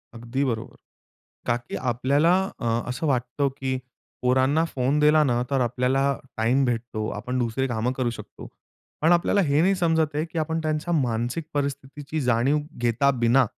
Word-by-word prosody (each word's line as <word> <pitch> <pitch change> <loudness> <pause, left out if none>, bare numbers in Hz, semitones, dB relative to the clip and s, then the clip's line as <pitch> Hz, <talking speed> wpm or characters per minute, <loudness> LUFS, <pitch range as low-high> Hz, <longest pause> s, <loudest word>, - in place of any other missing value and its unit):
अगदी 120 +4 -2
बरोबर. 110 -1 -5 0.7
का 120 - +2
की 120 - -9
आपल्याला 140 +8 +2 0.3
अ, 120 - -4 0.2
असं 125 +6 -3
वाटतं, 130 +1 0
की 130 -1 -1 0.5
पोरांना 130 +5 +3
फोन 135 +3 +1
दिला 150 +1 +5
ना, 120 -2 +1
तर 135 -2 +1
आपल्याला 125 +3 +1 0.3
टाईम 120 +5 +2
भेटतो. 115 -3 -2
आपण 125 +4 -3
दुसरी 120 +2 0
काम 120 0 -1
करू 125 -2 0
शकतो. 115 - -10 0.5
पण 160 +3 +4
आपल्याला 175 +4 +3
हे 145 +2 +4
नाही 195 +2 +3
समजत 160 -4 +1
आहे, 150 +2 0
की 165 0 -6
आपण 160 +1 -1
त्यांच्या 155 +2 -1
मानसिक 120 +2 -1
परिस्थितीची 140 +1 -3
जाणीव 125 +3 +2 0.3
घेता 120 +4 +3
बिना, 125 +3 +5
135 Hz, 160 wpm, -25 LUFS, 120-150 Hz, 0.7 s, दिला